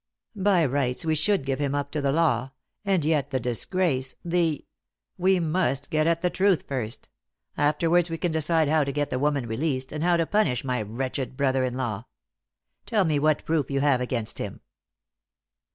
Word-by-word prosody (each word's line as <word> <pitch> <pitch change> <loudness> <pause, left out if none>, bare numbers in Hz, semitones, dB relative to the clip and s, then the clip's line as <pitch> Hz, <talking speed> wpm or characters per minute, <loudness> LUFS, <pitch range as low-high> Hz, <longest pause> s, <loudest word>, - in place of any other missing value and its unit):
By 190 -4 +3
rights, 135 +2 -1
we 160 - +2
should 160 +1 +1
give 135 0 -1
him 140 -1 0
up 145 0 -2
to 150 - -2
the 140 -1 +1
law 135 -5 +1 0.3
and 190 -6 +1
yet 150 -3 +1
the 130 -2 -1
disgrace 130 - -1
the 170 -3 0 0.3
" - - -60
"We 190 -1 +5
must 155 -4 0
get 155 0 +2
at 170 +1 +1
the 180 - +2
truth 190 -3 +2
first; 120 -5 -4 0.5
afterwards 165 +4 +2
we 165 - -3
can 175 0 -1
decide 160 0 +2
how 155 0 +3
to 140 - -2
get 145 +1 -2
the 130 - -1
woman 145 -2 +1
released, 130 +3 -2
and 150 +1 -3
how 175 0 +3
to 165 - +1
punish 160 - +1
my 125 -3 -1
wretched 130 +4 -4
brother 135 -2 +1
in 125 -1 -2
law. 115 -4 -3 0.8
Tell 210 -4 +2
me 155 -3 +1
what 155 +1 +1
proof 160 -3 0
you 140 -1 0
have 140 -3 +3
against 120 -3 -3
him?" - - -5
145 Hz, 190 wpm, -26 LUFS, 130-165 Hz, 0.8 s, We